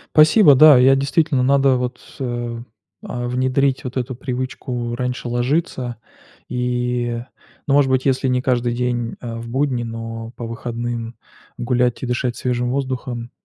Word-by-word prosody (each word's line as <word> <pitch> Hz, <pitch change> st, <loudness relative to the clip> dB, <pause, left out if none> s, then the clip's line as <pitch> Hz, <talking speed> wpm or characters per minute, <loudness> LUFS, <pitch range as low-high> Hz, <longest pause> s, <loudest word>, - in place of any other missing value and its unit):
Спасибо, 155 Hz, +2 st, +7 dB
да. 150 Hz, +1 st, +8 dB
Я 130 Hz, +2 st, +6 dB
действительно, 140 Hz, 0 st, +1 dB
надо 135 Hz, 0 st, +4 dB
вот, 125 Hz, 0 st, -3 dB, 0.2 s
э 120 Hz, -2 st, -3 dB, 0.4 s
а, 120 Hz, 0 st, -4 dB
внедрить 130 Hz, +2 st, +1 dB
вот 125 Hz, +1 st, -5 dB
эту 130 Hz, 0 st, -3 dB
привычку 125 Hz, -2 st, -4 dB
раньше 125 Hz, 0 st, -3 dB
ложиться 125 Hz, -1 st, -1 dB, 0.5 s
и, 125 Hz, -1 st, -1 dB, 0.5 s
ну, 140 Hz, -, +2 dB
может 140 Hz, -2 st, +4 dB
быть, 130 Hz, 0 st, +1 dB
если 130 Hz, -1 st, +1 dB
не 125 Hz, 0 st, +1 dB
каждый 120 Hz, -2 st, +1 dB
день, 120 Hz, -1 st, -2 dB
а, 115 Hz, -2 st, -6 dB
в 115 Hz, -, -8 dB
будни, 130 Hz, -1 st, 0 dB
но 115 Hz, 0 st, -6 dB
по 120 Hz, -, -5 dB
выходным 115 Hz, 0 st, -4 dB, 0.4 s
гулять 120 Hz, 0 st, 0 dB
и -, -, -3 dB
дышать 125 Hz, 0 st, -1 dB
свежим 125 Hz, -1 st, -1 dB
воздухом. 130 Hz, -3 st, -3 dB
125 Hz, 145 wpm, -20 LUFS, 120-130 Hz, 0.5 s, да